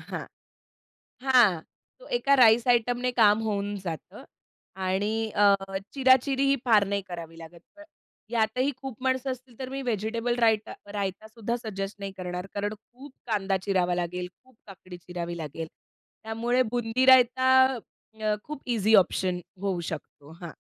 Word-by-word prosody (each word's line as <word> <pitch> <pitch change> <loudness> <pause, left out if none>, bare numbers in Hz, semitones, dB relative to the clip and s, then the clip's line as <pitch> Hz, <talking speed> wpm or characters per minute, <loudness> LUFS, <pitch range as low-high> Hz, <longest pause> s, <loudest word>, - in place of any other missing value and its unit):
हां, - - -5 1.1
हां. 210 -10 +5 0.4
तो - - -14
एका 280 -10 +2
राईस 235 -1 +5
आयटमने 245 +1 +2
काम 220 -3 +4
होऊन 205 -2 -2
जातं. 165 -3 -7 0.5
आणि 205 +4 -1
अ, 200 -1 +6 0.4
चिराचिरी 265 0 +3
ही 275 - +4
फार 215 -4 +5
नाही 200 0 -1
करावी 165 -2 -8
लागत. 165 +1 -12 0.2
पण 305 - -13 0.5
यातही 240 +4 +1
खूप 265 -5 -7
माणसं 260 0 0
असतील, 255 -2 -10
तर 260 -1 -5
मी 270 0 -4
व्हेजिटेबल 230 0 -1
रायता 220 -2 +2 0.2
रायता 200 +1 -3
सुद्धा 230 +1 -4
सजेस्ट 195 -2 -5
नाही 195 -1 -5
करणार. 180 0 -5
कारण 205 +1 -2
खूप 250 +6 -15 0.2
कांदा 195 -3 0
चिरावा 180 -3 +1
लागेल, 180 +1 -3 0.2
खूप 260 -2 -25
काकडी 185 -2 -11
चिरावी 175 -1 -6
लागेल. 160 +1 -6 0.6
त्यामुळे 235 +3 0
बुंदी 240 +1 0
रायता 260 0 +6 0.7
अ, 215 -1 +1
खूप 300 -2 -8
ईझी 220 -1 +4
ऑप्शन 185 -1 +2 0.2
होऊ 190 -3 -1
शकतो 150 -1 -9
हां. 170 -2 -7
220 Hz, 145 wpm, -27 LUFS, 190-245 Hz, 1.1 s, अ